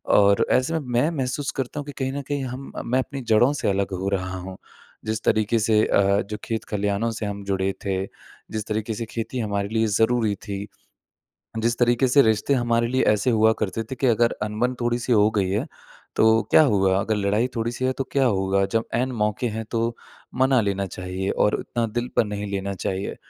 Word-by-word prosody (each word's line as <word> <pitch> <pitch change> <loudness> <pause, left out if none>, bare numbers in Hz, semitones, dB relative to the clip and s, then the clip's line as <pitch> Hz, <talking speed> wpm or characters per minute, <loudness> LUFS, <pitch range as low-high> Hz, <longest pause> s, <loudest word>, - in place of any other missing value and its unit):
और 100 -1 +5
ऐसे 130 +6 +2
में 160 - +1
मैं 125 +7 +3
महसूस 135 +2 -2
करता 135 +2 -3
हूँ 145 - -5
कि 145 - -7
कहीं 130 -1 -1
न 140 - -3
कहीं 145 -1 -2
हम 130 +2 -6
मैं 130 +2 +1
अपनी 135 +1 -4
जड़ों 120 +5 +5
से 145 - -1
अलग 100 0 0
हो 100 - 0
रहा 95 -1 -2
हूँ। 95 +1 -8 0.5
जिस 110 0 -2
तरीके 110 +1 +2
से 110 -1 +3
अ, 100 0 +3
जो 105 +1 -6
खेत-खलियानों 105 0 -1
से 110 -1 -4
हम 100 -1 -5
जुड़े 95 0 0
थे, 95 0 -1 0.5
जिस 110 -1 -3
तरीके 110 +1 -2
से 115 +2 -4
खेती 115 +2 -4
हमारे 100 -3 -1
लिए 110 0 +2
ज़रूरी 110 -2 +2
थी, 100 -1 -6 0.9
जिस 115 +1 0
तरीके 120 +2 +3
से 140 +3 +6
रिश्ते 110 +4 +2
हमारे 120 -2 +1
लिए 130 +2 +1
ऐसे 105 +5 0
हुआ 110 -1 +4
करते 110 +2 -2
थे - - -2
कि 135 - +2
अगर 120 0 +3
अनबन 110 +4 -1
थोड़ी-सी 120 +1 0
हो 105 -1 +5
गई 100 -4 0
है 100 - -1 0.5
तो 110 0 +5
क्या 155 - +7
हुआ 95 -7 +3
अगर 110 +1 -1
लड़ाई 105 +4 +1
थोड़ी-सी 115 +3 -2
है 130 - +2
तो 135 - 0
क्या 135 -1 +3
होगा, 100 -4 +2
जब 115 +2 0
ऐन 125 +2 +1
मौके 105 +1 -1
हैं 110 +1 -4
तो 115 0 -1 0.4
मना 130 0 +3
लेना 100 -2 -1
चाहिए 95 +1 -5
और 105 - +2
उतना 120 -1 -2
दिल 120 +3 -3
पर - - +5
नहीं 105 0 -4
लेना 100 0 -2
चाहिए। 95 +1 -3
110 Hz, 205 wpm, -24 LUFS, 100-120 Hz, 0.9 s, क्या